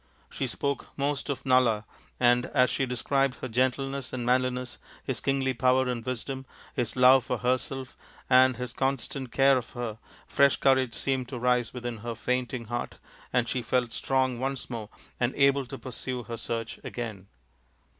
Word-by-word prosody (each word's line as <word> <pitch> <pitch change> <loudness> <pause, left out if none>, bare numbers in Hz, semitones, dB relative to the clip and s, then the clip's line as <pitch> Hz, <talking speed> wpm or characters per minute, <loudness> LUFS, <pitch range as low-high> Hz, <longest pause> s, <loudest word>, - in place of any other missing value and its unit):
She 135 - -2
spoke 140 +2 -2
most 145 0 -1
of 140 - -3
Nala, 125 -5 +3 0.3
and 120 0 +4
as 125 0 +3
she 135 - 0
described 135 +2 +1
his 130 0 -7
gentleness 130 +2 0
and 125 -2 -3
manli 130 +1 +3
ness, 125 0 -6 0.2
his - - -2
kingly 135 -1 +1
power 130 +1 +3
and 120 -2 -2
wisdom, 130 +2 -4 0.3
his 120 -2 -1
love 130 0 +7
for - - -2
herself 130 +1 -2 0.3
and 130 -1 +5
his 125 -1 -5
constant 135 -1 -2
care 135 -1 +5
of 120 - -11
her, 115 -3 -4 0.3
fresh 140 -1 +4
courage 130 -4 +3
seemed 130 +2 -1
to 130 - -5
rise 125 -1 +1
within 120 -2 -5
her 115 +1 -5
fainting 125 0 -2
heart 120 +2 -4 0.4
and 125 -1 +2
she 125 +1 -1
felt 120 0 0
strong 130 -2 +1
once 135 0 -3
more 110 -3 -5 0.3
and 125 +2 0
able 140 -1 +3
to 135 - -7
pursue 125 0 -5
her 115 +2 -5
search 115 0 -4
again. 110 -6 -6
125 Hz, 170 wpm, -28 LUFS, 120-135 Hz, 0.4 s, love